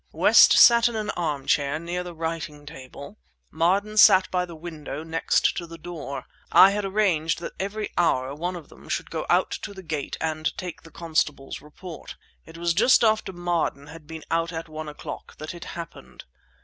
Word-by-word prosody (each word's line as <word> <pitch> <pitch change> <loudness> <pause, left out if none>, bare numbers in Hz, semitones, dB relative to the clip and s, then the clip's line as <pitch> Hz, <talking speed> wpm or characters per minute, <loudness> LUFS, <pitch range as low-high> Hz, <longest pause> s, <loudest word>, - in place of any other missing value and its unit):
West - - +7
sat 235 0 +7
in 235 - -7
an 215 -1 -2
armchair 145 -2 -1
near 175 +2 -4
the 175 -1 -9
writing 160 -2 -5
table; 140 - -11 0.3
Marden 200 +5 +1
sat 190 -3 +7
by 180 -1 0
the 170 -2 -11
window 155 -2 -7
next 165 0 +1
to 170 - -4
the 165 0 -10
door. 160 -4 -7 0.3
I 195 - +8
had 205 +1 -2
arranged 190 -6 +1
that - - -6
every 205 +2 -4
hour 135 -6 +1
one 175 +5 -4
of 170 -4 -10
them - - -16
should - - -3
go - - -4
out - - +3
to 200 - -7
the 190 - -10
gate 150 -4 -4
and 155 0 -2
take 180 -2 -6
the 165 - -15
constable's 155 -5 -2
report. 155 +3 -10 0.3
It 160 +1 -12
was 170 0 0
just 235 +9 +5
after 220 -3 +2
Marden 175 -5 -2
had 160 -2 -13
been 160 -1 -8
out 165 +1 0
at 165 0 -6
one 155 0 -7
o'clock 150 - -9
that 155 +2 -7
it 175 - -9
happened. 170 -1 -10
165 Hz, 190 wpm, -25 LUFS, 155-185 Hz, 0.3 s, I